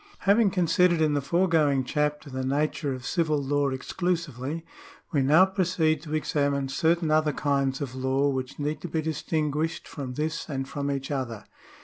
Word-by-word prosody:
Having 205 Hz, +1 st, +4 dB
considered 180 Hz, -1 st, +3 dB
in 155 Hz, -2 st, +2 dB
the 145 Hz, -, +1 dB
foregoing 155 Hz, -4 st, +2 dB
chapter 150 Hz, +2 st, -1 dB
the 130 Hz, 0 st, -3 dB
nature 145 Hz, +2 st, 0 dB
of 130 Hz, -1 st, -6 dB
civil 160 Hz, -4 st, +1 dB
law 145 Hz, 0 st, +1 dB
exclusively, 160 Hz, 0 st, -3 dB, 0.5 s
we 145 Hz, -5 st, +2 dB
now 155 Hz, +8 st, +6 dB
proceed 175 Hz, -5 st, +1 dB
to 155 Hz, -1 st, -4 dB
examine 140 Hz, -3 st, 0 dB
certain 160 Hz, +3 st, +1 dB
other 155 Hz, 0 st, +3 dB
kinds 140 Hz, -2 st, 0 dB
of 135 Hz, -3 st, -4 dB
law 130 Hz, +2 st, +1 dB
which 130 Hz, -2 st, -3 dB
need 150 Hz, +1 st, -2 dB
to 175 Hz, -, -5 dB
be 160 Hz, -1 st, -2 dB
distinguished 155 Hz, 0 st, -2 dB
from 130 Hz, -4 st, -6 dB
this 155 Hz, +3 st, -3 dB
and 135 Hz, -2 st, -3 dB
from 140 Hz, 0 st, -3 dB
each 140 Hz, 0 st, -3 dB
other. 125 Hz, -6 st, -3 dB
150 Hz, 165 wpm, -27 LUFS, 135-160 Hz, 0.5 s, now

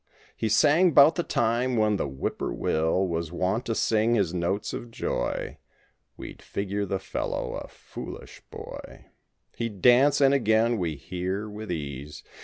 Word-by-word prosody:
He 110 Hz, -, -2 dB
sang 155 Hz, -, +4 dB
'bout 145 Hz, +4 st, +8 dB
the 175 Hz, -, -1 dB
time 120 Hz, -3 st, 0 dB
when 105 Hz, -1 st, +2 dB
the -, -, -2 dB
whippoorwill 80 Hz, +6 st, -1 dB
Was 85 Hz, -2 st, -3 dB
wont 95 Hz, +7 st, -1 dB
to 115 Hz, -, -1 dB
sing 110 Hz, +2 st, +2 dB
his 95 Hz, -6 st, +1 dB
notes 90 Hz, +3 st, -2 dB
of 120 Hz, -, -6 dB
joy— -, -, -3 dB, 0.6 s
We'd -, -, -9 dB
figure 100 Hz, 0 st, -3 dB
the 95 Hz, -, -1 dB
fellow 95 Hz, 0 st, -4 dB
a -, -, -11 dB
foolish -, -, -10 dB
boy. -, -, -10 dB, 0.4 s
He'd 115 Hz, -4 st, -4 dB
dance, 135 Hz, +4 st, +6 dB
and 135 Hz, -1 st, +5 dB
again, 115 Hz, -3 st, +2 dB
we 85 Hz, -4 st, -2 dB
hear, 90 Hz, +8 st, -4 dB
with 105 Hz, -1 st, -7 dB
ease. 75 Hz, -2 st, -6 dB
105 Hz, 150 wpm, -26 LUFS, 90-120 Hz, 0.6 s, bout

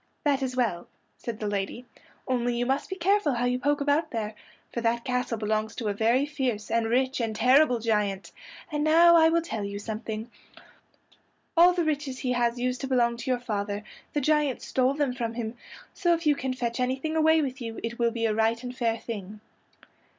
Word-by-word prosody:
"That 285 Hz, -2 st, +2 dB
is 255 Hz, -1 st, -2 dB
well," 225 Hz, -9 st, -1 dB, 0.3 s
said 230 Hz, -2 st, -5 dB
the 215 Hz, -, -4 dB
lady, 205 Hz, +4 st, -3 dB, 0.4 s
"only 245 Hz, -1 st, 0 dB
you 245 Hz, -, 0 dB
must 270 Hz, +3 st, -1 dB
be 380 Hz, -, -3 dB
careful 380 Hz, -5 st, +2 dB
how 240 Hz, +1 st, 0 dB
you 250 Hz, 0 st, +1 dB
poke 290 Hz, +2 st, +1 dB
about 290 Hz, +3 st, +1 dB
there, 220 Hz, -2 st, -3 dB, 0.4 s
for 235 Hz, -, -2 dB
that 235 Hz, 0 st, 0 dB
castle 250 Hz, -2 st, -1 dB
belongs 215 Hz, 0 st, -1 dB
to 225 Hz, -4 st, -2 dB
a -, -, 0 dB
very 230 Hz, +6 st, +2 dB
fierce 255 Hz, -8 st, -3 dB
and 230 Hz, 0 st, +1 dB
rich 260 Hz, +2 st, +1 dB
and 225 Hz, -2 st, -2 dB
terrible 255 Hz, +3 st, +5 dB
giant: 210 Hz, -4 st, -1 dB, 0.4 s
and 295 Hz, 0 st, -1 dB
now 335 Hz, +2 st, +6 dB
I 320 Hz, -1 st, +6 dB
will 335 Hz, 0 st, +2 dB
tell 225 Hz, -11 st, -4 dB
you 200 Hz, 0 st, -4 dB
something: 220 Hz, +1 st, -5 dB, 1.2 s
all 350 Hz, +2 st, +7 dB
the 350 Hz, -1 st, 0 dB
riches 290 Hz, -4 st, -2 dB
he 255 Hz, -1 st, -2 dB
has 240 Hz, -1 st, +1 dB
used 250 Hz, +1 st, -1 dB
to 270 Hz, -, -3 dB
belong 240 Hz, -2 st, +2 dB
to 240 Hz, +2 st, -5 dB
your 250 Hz, -1 st, +1 dB
father; 205 Hz, -3 st, -3 dB, 0.3 s
the 295 Hz, -, 0 dB
giant 300 Hz, -2 st, +1 dB
stole 260 Hz, +1 st, +1 dB
them 285 Hz, -4 st, 0 dB
from 230 Hz, -2 st, -3 dB
him, 230 Hz, -1 st, -4 dB, 0.4 s
so 345 Hz, -3 st, +2 dB
if 330 Hz, 0 st, -7 dB
you 295 Hz, -1 st, +4 dB
can 260 Hz, -1 st, -3 dB
fetch 235 Hz, -1 st, -3 dB
anything 265 Hz, +5 st, -1 dB
away 320 Hz, 0 st, +4 dB
with 260 Hz, -1 st, -4 dB
you 230 Hz, -1 st, -5 dB
it 230 Hz, +1 st, -4 dB
will 235 Hz, 0 st, +3 dB
be 230 Hz, 0 st, -2 dB
a 220 Hz, -, +2 dB
right 225 Hz, +2 st, +1 dB
and 250 Hz, 0 st, -6 dB
fair 230 Hz, -3 st, 0 dB
thing." 210 Hz, -3 st, -7 dB
245 Hz, 210 wpm, -27 LUFS, 225-285 Hz, 1.2 s, all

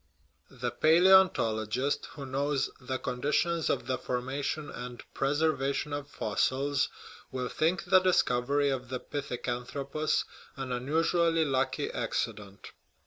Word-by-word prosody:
* -, -, -40 dB
The 120 Hz, -, +1 dB
palaeontologist, 145 Hz, -, +4 dB
who 140 Hz, -3 st, -6 dB
knows 140 Hz, +1 st, -1 dB
the 130 Hz, 0 st, -3 dB
con 125 Hz, -1 st, -4 dB
ditions 165 Hz, +3 st, +1 dB
of -, -, 0 dB
the 130 Hz, -1 st, -1 dB
formation 135 Hz, +4 st, -3 dB
and 125 Hz, -1 st, -7 dB
preservation 145 Hz, 0 st, 0 dB
of 145 Hz, 0 st, -4 dB
fossils, 135 Hz, +5 st, 0 dB, 0.4 s
will 130 Hz, -2 st, -2 dB
think 170 Hz, +3 st, +1 dB
the 185 Hz, +1 st, +6 dB
discovery 145 Hz, -6 st, +2 dB
of 130 Hz, -1 st, -4 dB
the 130 Hz, 0 st, -3 dB
pithecanthropus 140 Hz, +2 st, -2 dB, 0.3 s
an 135 Hz, -1 st, -5 dB
unusu 160 Hz, +7 st, +1 dB
ally 165 Hz, -1 st, +3 dB
lucky 135 Hz, 0 st, 0 dB
accident. 105 Hz, -4 st, -4 dB
135 Hz, 125 wpm, -30 LUFS, 125-155 Hz, 0.4 s, the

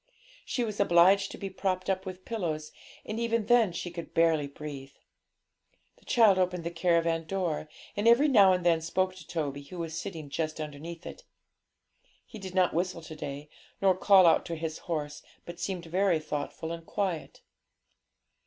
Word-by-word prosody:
She 245 Hz, -, -1 dB
was 215 Hz, -3 st, -4 dB
obliged 195 Hz, +1 st, +5 dB
to -, -, -8 dB
be 195 Hz, -1 st, -5 dB
propped 185 Hz, -1 st, -2 dB
up 190 Hz, 0 st, -1 dB
with 185 Hz, 0 st, -8 dB
pillows, 160 Hz, -9 st, -3 dB, 0.3 s
and 215 Hz, +1 st, -4 dB
even 230 Hz, -2 st, 0 dB
then 235 Hz, -5 st, +4 dB
she 175 Hz, +1 st, -5 dB
could 170 Hz, -1 st, -7 dB
hardly 165 Hz, -3 st, +3 dB
breathe. 140 Hz, -1 st, -8 dB, 1.0 s
The -, -, -25 dB
child 215 Hz, -6 st, +5 dB
opened 180 Hz, -1 st, 0 dB
the 170 Hz, -, -3 dB
caravan 165 Hz, -1 st, +1 dB
door, 170 Hz, -4 st, -2 dB, 0.3 s
and 205 Hz, +2 st, 0 dB
every 240 Hz, +6 st, +6 dB
now 205 Hz, -9 st, +6 dB
and 180 Hz, -1 st, 0 dB
then 165 Hz, -2 st, +4 dB
spoke 185 Hz, +3 st, 0 dB
to -, -, -12 dB
Toby, 145 Hz, -4 st, -3 dB
who 180 Hz, +6 st, -10 dB
was 165 Hz, -2 st, -4 dB
sitting 165 Hz, -7 st, -6 dB
just 155 Hz, +1 st, -2 dB
underneath 155 Hz, +3 st, -7 dB
it. -, -, -9 dB, 1.0 s
He 220 Hz, -, -11 dB
did 190 Hz, -1 st, -8 dB
not 185 Hz, -1 st, +3 dB
whistle 175 Hz, 0 st, -2 dB
to 155 Hz, 0 st, -9 dB
day, 145 Hz, 0 st, -6 dB, 0.3 s
nor 190 Hz, -2 st, +4 dB
call 190 Hz, 0 st, +6 dB
out 165 Hz, -, +5 dB
to 170 Hz, -, -3 dB
his 160 Hz, -1 st, -4 dB
horse, 150 Hz, -3 st, -3 dB, 0.2 s
but 175 Hz, 0 st, -9 dB
seemed 180 Hz, -1 st, -3 dB
very 180 Hz, +1 st, +2 dB
thoughtful 155 Hz, +1 st, -4 dB
and 165 Hz, 0 st, -6 dB
quiet. 180 Hz, -2 st, -3 dB
175 Hz, 175 wpm, -29 LUFS, 160-190 Hz, 1.0 s, every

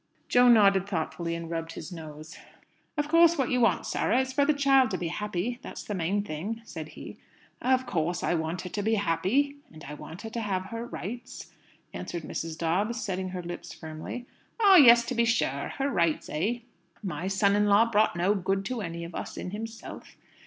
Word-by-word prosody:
Jo 245 Hz, 0 st, +6 dB
nodded 200 Hz, -5 st, +5 dB
thoughtfully, 170 Hz, -1 st, -2 dB
and 170 Hz, 0 st, -5 dB
rubbed 165 Hz, 0 st, -3 dB
his -, -, -8 dB
nose. 155 Hz, -2 st, -9 dB, 0.6 s
"Of 295 Hz, 0 st, 0 dB
course, 335 Hz, +1 st, +5 dB
what 265 Hz, -3 st, 0 dB
you 250 Hz, -1 st, +2 dB
want, 230 Hz, -, +3 dB
Sarah, 245 Hz, -, +1 dB
is 260 Hz, 0 st, -4 dB
for 285 Hz, +1 st, +3 dB
the 300 Hz, -, +4 dB
child 270 Hz, -3 st, +4 dB
to 185 Hz, -, -2 dB
be 170 Hz, -2 st, -3 dB
happy. 210 Hz, +5 st, -3 dB
That's -, -, -8 dB
the 210 Hz, -, -5 dB
main 190 Hz, +3 st, 0 dB
thing," 205 Hz, +6 st, -5 dB
said 160 Hz, -7 st, -7 dB
he. -, -, -9 dB, 0.4 s
"Of 260 Hz, 0 st, +2 dB
course 175 Hz, -5 st, -1 dB
I -, -, +1 dB
want 160 Hz, +1 st, -2 dB
her 180 Hz, -, -6 dB
to 205 Hz, -, -3 dB
be 220 Hz, +2 st, +2 dB
happy. 205 Hz, -, +1 dB
And 155 Hz, -2 st, -13 dB
I 150 Hz, -, -7 dB
want 160 Hz, +5 st, -9 dB
her 225 Hz, -, -6 dB
to 235 Hz, -, -3 dB
have 190 Hz, -3 st, -2 dB
her 230 Hz, +1 st, -4 dB
rights," 240 Hz, +4 st, -7 dB, 0.4 s
answered 170 Hz, -2 st, -5 dB
Mrs. 160 Hz, +1 st, -5 dB
Dobbs, 195 Hz, +9 st, 0 dB
setting 190 Hz, -3 st, -3 dB
her 180 Hz, -1 st, -5 dB
lips 175 Hz, 0 st, -7 dB
firmly. 160 Hz, +9 st, -7 dB, 0.3 s
"Ah! 400 Hz, -4 st, +8 dB
Yes, 235 Hz, -5 st, +8 dB
to 255 Hz, -, -3 dB
be 235 Hz, -1 st, +2 dB
sure! 180 Hz, -, 0 dB
Her 275 Hz, +1 st, 0 dB
rights, 170 Hz, -, +1 dB
eh?" 210 Hz, +11 st, -1 dB, 0.4 s
"My 185 Hz, -1 st, -3 dB
son 200 Hz, +1 st, +3 dB
in 210 Hz, 0 st, +3 dB
law 205 Hz, +3 st, +6 dB
brought 220 Hz, -3 st, +2 dB
no 180 Hz, +4 st, +2 dB
good 195 Hz, 0 st, -1 dB
to 245 Hz, +1 st, -3 dB
any 170 Hz, -2 st, -5 dB
of 170 Hz, 0 st, -8 dB
us -, -, -6 dB
in 180 Hz, -, -5 dB
himself. 225 Hz, +2 st, -8 dB
200 Hz, 205 wpm, -28 LUFS, 170-235 Hz, 0.6 s, Ah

